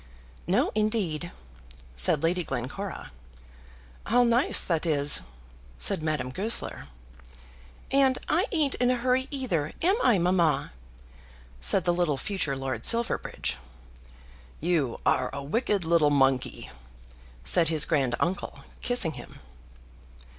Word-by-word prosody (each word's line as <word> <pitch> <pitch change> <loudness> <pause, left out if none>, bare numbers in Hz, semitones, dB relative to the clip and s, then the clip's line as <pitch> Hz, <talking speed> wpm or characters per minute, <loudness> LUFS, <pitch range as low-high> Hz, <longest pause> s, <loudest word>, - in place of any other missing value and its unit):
"No, - - +1
indeed," 205 -7 -1 0.6
said 105 - +3
Lady 175 +2 +1
Glencora. 135 +9 -6 1.0
"How 245 +4 +3
nice 240 +2 +3
that 165 -3 -1
is," 145 -2 +4 0.6
said 60 - +3
Madame 155 -5 -2
Goesler. 195 - -2 1.0
"And 270 -1 +3
I 360 +8 +1
ain't 305 -7 +1
in 245 0 +1
a 255 - +2
hurry 255 +2 0
either, 190 - -2
am 375 +4 +4
I, 230 - +3
mamma?" 175 -3 +1 0.9
said 70 - +4
the 175 - +2
little 175 -5 0
future 155 -6 -3
Lord 135 0 -4
Silverbridge. 235 0 0 1.0
"You 155 -7 -1
are 130 0 +1
a 140 - -6
wicked 200 - -1
little 165 -2 +3
monkey," 135 -2 0 0.7
said 115 - +3
his 155 -2 +3
grand 135 -7 0
uncle, 190 +3 -3 0.2
kissing 245 -10 +3
him. - - -11
175 Hz, 120 wpm, -26 LUFS, 145-235 Hz, 1.0 s, is